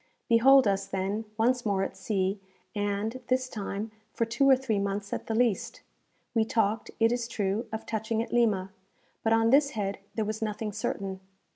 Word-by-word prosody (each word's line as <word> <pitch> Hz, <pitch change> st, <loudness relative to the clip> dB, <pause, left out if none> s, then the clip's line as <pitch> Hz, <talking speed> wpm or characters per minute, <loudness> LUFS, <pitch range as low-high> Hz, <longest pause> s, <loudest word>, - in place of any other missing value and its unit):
Behold 255 Hz, +2 st, +6 dB
us, 195 Hz, 0 st, 0 dB
then, 195 Hz, +3 st, -2 dB
once 245 Hz, +2 st, +2 dB
more 200 Hz, -3 st, +1 dB
at -, -, -4 dB
sea, 195 Hz, -1 st, -1 dB, 0.3 s
and, 205 Hz, +4 st, -2 dB
this 255 Hz, 0 st, +1 dB
time, 210 Hz, -1 st, -4 dB, 0.2 s
for 230 Hz, -, +1 dB
two 235 Hz, +5 st, +2 dB
or 265 Hz, -, +8 dB
three 255 Hz, -6 st, -1 dB
months 200 Hz, 0 st, -2 dB
at -, -, -4 dB
the 225 Hz, -, -1 dB
least. 235 Hz, 0 st, 0 dB, 0.5 s
We 225 Hz, -2 st, +3 dB
talked, 220 Hz, -1 st, 0 dB
it 225 Hz, 0 st, +4 dB
is 240 Hz, -1 st, -1 dB
true, 210 Hz, 0 st, -1 dB
of 220 Hz, 0 st, -5 dB
touching 220 Hz, 0 st, -2 dB
at -, -, -9 dB
Lima, 205 Hz, -6 st, +2 dB, 0.5 s
but 225 Hz, -, +1 dB
on 225 Hz, 0 st, +4 dB
this 280 Hz, +1 st, +4 dB
head 200 Hz, -1 st, -2 dB, 0.2 s
there 220 Hz, -, 0 dB
was 215 Hz, +1 st, -4 dB
nothing 215 Hz, 0 st, -2 dB
certain. 195 Hz, -2 st, -3 dB
220 Hz, 180 wpm, -28 LUFS, 200-235 Hz, 0.5 s, or